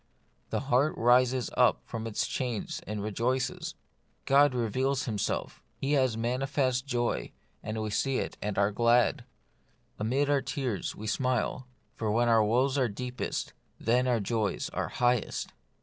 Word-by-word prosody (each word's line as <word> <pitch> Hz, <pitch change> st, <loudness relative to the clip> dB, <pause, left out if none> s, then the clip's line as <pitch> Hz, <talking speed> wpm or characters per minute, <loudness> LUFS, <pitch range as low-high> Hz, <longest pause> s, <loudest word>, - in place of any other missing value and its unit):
The -, -, -1 dB
heart 140 Hz, +3 st, +2 dB
rises 125 Hz, +1 st, +3 dB
up -, -, +3 dB
from 115 Hz, 0 st, -5 dB
its 110 Hz, -, -1 dB
chains 120 Hz, -5 st, -3 dB
and 105 Hz, 0 st, -3 dB
rejoices. 125 Hz, +5 st, -1 dB, 0.5 s
God 140 Hz, +1 st, +5 dB
has 125 Hz, -, -1 dB
revealed 130 Hz, +4 st, 0 dB
Himself; 105 Hz, -6 st, -2 dB
He 135 Hz, -, -2 dB
has 130 Hz, -6 st, +2 dB
manifested 130 Hz, +2 st, 0 dB
joy, 120 Hz, -3 st, -1 dB, 0.3 s
and 110 Hz, 0 st, -4 dB
we 110 Hz, -1 st, -3 dB
see 135 Hz, +4 st, +1 dB
it -, -, -3 dB
and 105 Hz, -1 st, -3 dB
are 100 Hz, +1 st, +3 dB
glad. 120 Hz, +4 st, +3 dB, 0.7 s
Amid 130 Hz, +7 st, +1 dB
our 145 Hz, -1 st, +2 dB
tears 130 Hz, -, -3 dB
we 110 Hz, -, -8 dB
smile, 130 Hz, +2 st, -1 dB, 0.3 s
for 110 Hz, -, -3 dB
when 120 Hz, +3 st, +2 dB
our 115 Hz, -1 st, +5 dB
woes 130 Hz, +6 st, +2 dB
are 125 Hz, -3 st, +2 dB
deepest, 125 Hz, +4 st, -4 dB, 0.3 s
then 125 Hz, +3 st, +2 dB
our 120 Hz, -2 st, +2 dB
joys 105 Hz, -1 st, -1 dB
are -, -, -2 dB
highest. 125 Hz, -2 st, 0 dB
125 Hz, 150 wpm, -29 LUFS, 110-130 Hz, 0.7 s, God